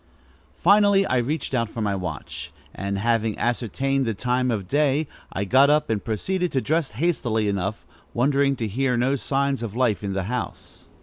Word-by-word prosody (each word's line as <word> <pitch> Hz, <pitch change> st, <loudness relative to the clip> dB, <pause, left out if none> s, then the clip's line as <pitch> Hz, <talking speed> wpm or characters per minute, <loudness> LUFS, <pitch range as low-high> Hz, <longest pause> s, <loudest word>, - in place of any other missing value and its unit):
Finally 200 Hz, +1 st, +5 dB
I 130 Hz, -, +1 dB
reached 135 Hz, +5 st, -2 dB
out 115 Hz, -3 st, 0 dB
for 115 Hz, -, -7 dB
my 105 Hz, -2 st, 0 dB
watch, 90 Hz, -6 st, -5 dB, 0.2 s
and, 100 Hz, +1 st, -3 dB
having 115 Hz, 0 st, 0 dB
ascertained 130 Hz, +3 st, 0 dB
the 115 Hz, -, -1 dB
time 125 Hz, +3 st, 0 dB
of 105 Hz, -6 st, -2 dB
day, 145 Hz, -, +2 dB, 0.2 s
I 95 Hz, -, -2 dB
got 135 Hz, +7 st, +5 dB
up 150 Hz, -3 st, +2 dB
and 105 Hz, -2 st, -1 dB
proceeded 180 Hz, -, -1 dB
to 135 Hz, -, +2 dB
dress 155 Hz, -3 st, 0 dB
hastily 120 Hz, -9 st, 0 dB
enough, 100 Hz, +1 st, -2 dB, 0.3 s
wondering 140 Hz, +2 st, +2 dB
to 115 Hz, -3 st, -3 dB
hear 125 Hz, +4 st, 0 dB
no 130 Hz, +3 st, +2 dB
signs 140 Hz, 0 st, -1 dB
of 115 Hz, -3 st, -5 dB
life 120 Hz, -5 st, +1 dB
in 100 Hz, -1 st, -2 dB
the 95 Hz, -1 st, -1 dB
house. 120 Hz, +5 st, -6 dB
125 Hz, 180 wpm, -24 LUFS, 110-140 Hz, 0.3 s, Finally